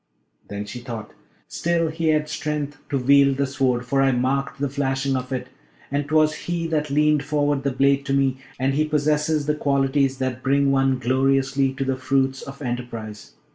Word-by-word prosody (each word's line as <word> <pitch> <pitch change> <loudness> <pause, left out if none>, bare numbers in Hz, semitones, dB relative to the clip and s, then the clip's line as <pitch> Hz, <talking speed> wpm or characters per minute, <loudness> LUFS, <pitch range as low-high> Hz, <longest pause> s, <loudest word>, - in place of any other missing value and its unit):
Then 100 0 -5
she 125 - -7
thought, 115 -3 -7 0.4
'Still 170 -1 0
he 160 +1 -2
had 155 -1 +2
strength 145 -1 -3
to 140 - 0
wield 140 +1 +4
the 140 - +1
Sword, 130 -2 0
for 135 +2 +1
I 135 0 +4
marked 130 +3 -1
the 140 - 0
flashing 135 0 -1
of 130 0 -4
it, 125 -1 -3 0.4
and 145 0 -1
'twas 155 0 +3
he 170 -1 -1
that 150 -2 -1
leaned 150 +1 +3
forward 145 -1 0
the 140 - 0
blade 140 +1 +2
to 135 - 0
me; 135 -1 +2 0.2
and 135 +1 +1
he 150 +3 +2
possesses 150 0 +1
the 150 - +1
qualities 140 -2 +1
that 130 -1 -3
bring 140 +1 +2
one 135 -1 +2
gloriously 135 +2 +1
to 135 0 -3
the 135 -1 -1
fruits 135 0 0
of 140 +1 -9
enterprise!' 120 -4 -6
135 Hz, 185 wpm, -23 LUFS, 130-145 Hz, 0.4 s, wield